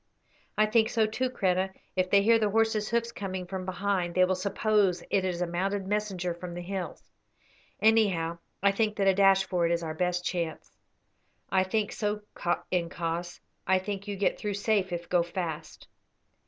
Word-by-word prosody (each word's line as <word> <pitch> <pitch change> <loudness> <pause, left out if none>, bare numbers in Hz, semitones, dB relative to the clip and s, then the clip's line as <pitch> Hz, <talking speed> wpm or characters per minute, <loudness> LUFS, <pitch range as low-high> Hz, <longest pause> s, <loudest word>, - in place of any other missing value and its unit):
"I 215 - +5
think 220 +1 +3
so 225 -2 +2
too, 250 +4 -1
Kreta. 190 -5 +1 0.3
If 185 -1 +1
they 200 +1 +5
hear 230 +2 +5
the 215 -2 +2
horse's 220 0 +1
hoofs 235 0 0
coming 190 -4 -5
from 185 +1 -5
behind 185 -2 -1
they 185 0 +6
will 185 - +1
suppose 200 0 +1
it 195 - +2
is 180 -1 -1
a - - 0
mounted 190 +3 -2
messenger 195 -3 -1
from 175 0 -8
the 175 - -5
hills. 190 0 -5 0.8
Anyhow, 190 -7 +3 0.2
I 200 - +5
think 210 +1 0
that 200 -2 0
a 195 - +5
dash 195 0 +5
for 180 -3 +1
it - - -1
is 170 0 0
our 160 -1 -3
best 180 +1 -1
chance." 170 -3 -3 0.8
"I 190 -1 +4
think 205 +2 -1
so, 210 0 -2 0.5
incos. 170 -1 -2 0.3
I 190 0 +4
think 200 +1 -4
you 205 - -3
get 200 0 0
through 205 -1 -2
safe 200 -2 +1
if 170 0 -4
go 175 -1 +3
fast." 170 -2 -5
190 Hz, 180 wpm, -28 LUFS, 175-210 Hz, 0.8 s, they